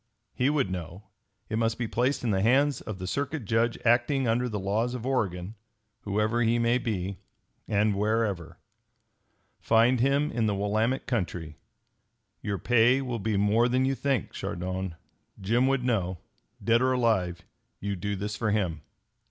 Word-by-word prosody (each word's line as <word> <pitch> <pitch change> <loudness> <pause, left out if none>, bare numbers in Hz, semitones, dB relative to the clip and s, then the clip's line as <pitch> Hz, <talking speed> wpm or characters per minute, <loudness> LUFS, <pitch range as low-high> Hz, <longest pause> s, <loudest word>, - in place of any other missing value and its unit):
He 125 +2 +1
would 140 -10 +1
know. 90 +2 -6 0.4
It 110 - -2
must 115 0 +1
be 120 - -2
placed 125 +5 0
in 115 - +1
the 95 -1 +1
hands 135 +6 +3
of 110 - -6
the 95 - -6
Circuit 140 - -3
Judge 115 +3 +1
acting 120 +3 +3
under, 120 +2 +1
the 105 - -3
laws 110 +6 -1
of 120 -1 -6
Oregon, 100 -7 -1 0.5
whoever 105 +3 +1
he 115 0 +3
may 120 +1 +2
be, 95 -5 -3 0.5
and 105 0 +2
wherever. 105 -4 -1 1.0
Find 115 +2 +3
him 140 +4 +2
in 115 -2 0
the 105 - 0
Willamette 110 +6 0
country. 90 - -3 0.8
Your 100 -1 -2
pay 125 +5 +3
will 120 -3 -3
be 105 0 -1
more 110 +4 +3
than 130 +1 +2
you 135 - +1
think, 135 -5 -1
Chardon. 95 0 -4 0.4
Jim 115 +7 +2
would 135 -2 +1
know. 95 -7 0 0.5
Dead 115 +1 +3
or 130 0 +3
alive, 95 -8 +1 0.4
you 100 0 -3
do 100 +3 -3
this 105 +2 -4
for 110 0 -1
him. 90 -7 0
110 Hz, 160 wpm, -27 LUFS, 100-125 Hz, 1.0 s, hands